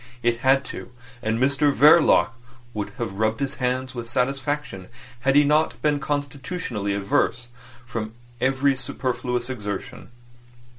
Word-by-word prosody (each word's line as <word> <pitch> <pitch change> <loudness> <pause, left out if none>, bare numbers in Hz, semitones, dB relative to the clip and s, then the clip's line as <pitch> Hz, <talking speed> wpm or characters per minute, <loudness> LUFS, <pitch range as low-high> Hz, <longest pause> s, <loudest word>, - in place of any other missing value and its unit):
It 120 0 +2
had 135 +2 +3
to—and 120 -3 -6
Mr 140 +3 +3
Verloc 145 - +6 0.4
would 105 -1 -3
have 110 -6 -4
rubbed 110 0 +1
his 140 -1 -1
hands 130 +1 -1
with 120 -2 -6
satisfaction 135 -5 -2 0.3
had 135 +2 +2
he 145 - +7
not 150 +2 +2
been 150 -1 +2
constitutionally 145 - -3
averse 115 +4 0 0.4
from 110 -3 -5 0.3
every 135 +2 +2
superfluous 125 -1 -2
exertion. 115 -1 -6
125 Hz, 120 wpm, -24 LUFS, 115-140 Hz, 0.4 s, he